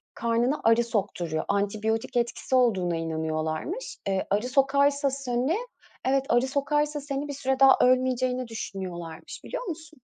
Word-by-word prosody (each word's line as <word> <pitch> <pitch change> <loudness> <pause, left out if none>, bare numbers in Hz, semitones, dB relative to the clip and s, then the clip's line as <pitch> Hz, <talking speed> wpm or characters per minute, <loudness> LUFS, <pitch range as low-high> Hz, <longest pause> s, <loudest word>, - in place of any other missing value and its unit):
karnına 235 +5 0
arı 230 +1 +5
sokturuyor. 190 -8 -2
Antibiyotik 215 +4 -1
etkisi 240 +2 -1
olduğuna 190 -9 +2
inanıyorlarmış. 160 - -3
Eee, 190 -1 0
arı 210 +5 +1
sokarsa 280 +1 +3
seni 265 +4 -1 0.5
evet 270 0 +2
arı 240 +2 +3
sokarsa 295 +2 0
seni 280 0 -3
bir 285 - -4
süre 265 -1 -1
daha 270 -1 +7
ölmeyeceğini 255 0 +2
düşünüyorlarmış. 180 -7 -7
Biliyor - - -4
musun? 315 -3 -7
250 Hz, 130 wpm, -27 LUFS, 200-275 Hz, 0.5 s, daha